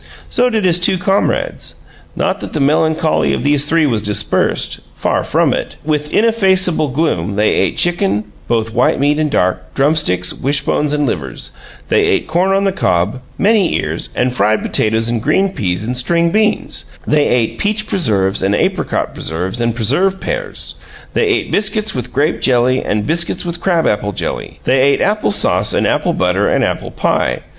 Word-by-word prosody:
So 250 Hz, +1 st, +2 dB
did 220 Hz, -4 st, 0 dB
his 175 Hz, -1 st, +3 dB
two 180 Hz, +1 st, +2 dB
comrades. 195 Hz, +2 st, -1 dB, 0.4 s
Not -, -, -1 dB
that -, -, -8 dB
the 155 Hz, -, -1 dB
melancholy 155 Hz, +2 st, +1 dB
of -, -, -2 dB
these 145 Hz, 0 st, +2 dB
three 160 Hz, +1 st, +2 dB
was 115 Hz, -6 st, 0 dB
dispersed 105 Hz, 0 st, 0 dB, 0.2 s
far -, -, 0 dB
from -, -, +1 dB
it! -, -, -4 dB
With 150 Hz, -1 st, -2 dB
ineffaceable 190 Hz, -8 st, +2 dB
gloom 125 Hz, -, -1 dB
they 105 Hz, +1 st, +2 dB
ate 95 Hz, -, 0 dB
chicken, 175 Hz, -, +1 dB, 0.2 s
both 115 Hz, -1 st, -1 dB
white 125 Hz, +2 st, +2 dB
meat 145 Hz, +2 st, +2 dB
and 155 Hz, -1 st, +1 dB
dark, 90 Hz, -9 st, -1 dB
drumsticks, 135 Hz, -, +1 dB
wishbones, 145 Hz, +1 st, 0 dB
and 150 Hz, -1 st, +1 dB
livers; 70 Hz, -, -4 dB, 0.4 s
they -, -, +3 dB
ate -, -, +1 dB
corn 175 Hz, +4 st, +1 dB
on 195 Hz, +1 st, +2 dB
the 195 Hz, -, +2 dB
cob, 100 Hz, -, 0 dB, 0.2 s
many 205 Hz, -4 st, +2 dB
ears, -, -, -3 dB
and 125 Hz, 0 st, 0 dB
fried 110 Hz, -2 st, +1 dB
potatoes 110 Hz, +1 st, 0 dB
and 115 Hz, -1 st, -1 dB
green 190 Hz, -, +2 dB
peas 90 Hz, -, -2 dB
and 125 Hz, +2 st, -3 dB
string 170 Hz, +7 st, +1 dB
beans; 215 Hz, +2 st, 0 dB, 0.2 s
they 150 Hz, -1 st, +2 dB
ate 120 Hz, -2 st, 0 dB
peach 215 Hz, +1 st, -1 dB
preserves 105 Hz, -, 0 dB
and 100 Hz, +2 st, +1 dB
apricot -, -, -1 dB
preserves 90 Hz, +8 st, -4 dB
and 115 Hz, -1 st, 0 dB
preserved 165 Hz, -, +1 dB
pears; -, -, -5 dB, 0.4 s
they 455 Hz, -, +1 dB
ate 380 Hz, -3 st, 0 dB
biscuits 215 Hz, +1 st, +1 dB
with 125 Hz, -, -5 dB
grape 150 Hz, +4 st, 0 dB
jelly 130 Hz, 0 st, +2 dB
and 105 Hz, 0 st, -1 dB
biscuits 170 Hz, +3 st, 0 dB
with 170 Hz, 0 st, -4 dB
crabapple 135 Hz, -, 0 dB
jelly; -, -, -4 dB
they 130 Hz, +1 st, +2 dB
ate 140 Hz, +1 st, +3 dB
apple 210 Hz, +1 st, +1 dB
sauce -, -, +2 dB
and -, -, +1 dB
apple -, -, +1 dB
butter -, -, +1 dB
and -, -, +1 dB
apple -, -, -2 dB
pie. -, -, -1 dB
145 Hz, 175 wpm, -15 LUFS, 115-185 Hz, 0.4 s, his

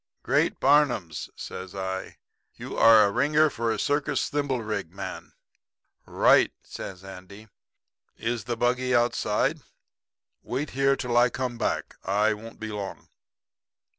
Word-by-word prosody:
"'Great -, -, +1 dB
Barnums?' 130 Hz, -, +2 dB
says 95 Hz, +1 st, -8 dB
I. 95 Hz, -1 st, -5 dB, 0.4 s
'You're 115 Hz, -1 st, +5 dB
a 100 Hz, -, +2 dB
ringer 150 Hz, +6 st, +3 dB
for 115 Hz, -1 st, -1 dB
a -, -, -1 dB
circus 145 Hz, -1 st, 0 dB
thimblerig 120 Hz, -, -2 dB
man.' 95 Hz, +3 st, -8 dB, 0.7 s
"'Right,' -, -, +4 dB
says 95 Hz, -1 st, -8 dB
Andy. 95 Hz, +3 st, -12 dB, 0.7 s
'Is 115 Hz, -1 st, -3 dB
the 120 Hz, -1 st, -3 dB
buggy 125 Hz, +1 st, +1 dB
outside? 120 Hz, +4 st, +1 dB, 0.8 s
Wait 140 Hz, +5 st, -4 dB
here 135 Hz, +1 st, +2 dB
till 125 Hz, -2 st, -3 dB
I 120 Hz, +1 st, +5 dB
come 125 Hz, -2 st, -4 dB
back. -, -, -2 dB
I 105 Hz, +3 st, +2 dB
won't 115 Hz, +2 st, -11 dB
be 110 Hz, -1 st, -5 dB
long.' 100 Hz, -2 st, -6 dB
115 Hz, 125 wpm, -26 LUFS, 100-130 Hz, 0.8 s, You're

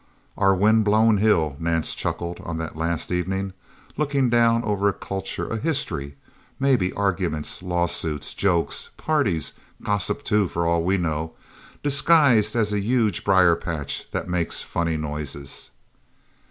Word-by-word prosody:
"Our 95 Hz, -1 st, +3 dB
wind 110 Hz, +3 st, +4 dB
blown 110 Hz, +1 st, +4 dB
hill," 85 Hz, -9 st, +2 dB
Nance 80 Hz, -1 st, 0 dB
chuckled 85 Hz, 0 st, -4 dB
on 85 Hz, -1 st, -5 dB
that 80 Hz, -1 st, -5 dB
last 80 Hz, +1 st, -2 dB
evening. 95 Hz, +2 st, -2 dB, 0.4 s
"Looking 140 Hz, -4 st, +1 dB
down 115 Hz, 0 st, +3 dB
over 100 Hz, -2 st, +1 dB
a -, -, -1 dB
culture, 95 Hz, +1 st, -4 dB
a 115 Hz, -, -3 dB
history 70 Hz, -, -3 dB, 0.4 s
maybe 130 Hz, -9 st, +2 dB
arguments, 90 Hz, -7 st, -1 dB
lawsuits, 85 Hz, -4 st, -1 dB
jokes, 90 Hz, -4 st, 0 dB
parties; 105 Hz, -, +1 dB, 0.3 s
gossip 105 Hz, -2 st, 0 dB
too, 105 Hz, -2 st, +2 dB
for 85 Hz, 0 st, -2 dB
all 85 Hz, 0 st, +2 dB
we 95 Hz, +3 st, +2 dB
know 80 Hz, -2 st, -2 dB, 0.5 s
disguised 140 Hz, -7 st, +4 dB
as 105 Hz, -3 st, +1 dB
a 105 Hz, -, +1 dB
huge 110 Hz, -2 st, +1 dB
briar 95 Hz, -3 st, +5 dB
patch 80 Hz, -4 st, -4 dB
that -, -, -4 dB
makes 90 Hz, -2 st, 0 dB
funny 85 Hz, -1 st, -1 dB
noises." 75 Hz, -2 st, -5 dB
95 Hz, 140 wpm, -23 LUFS, 85-110 Hz, 0.5 s, briar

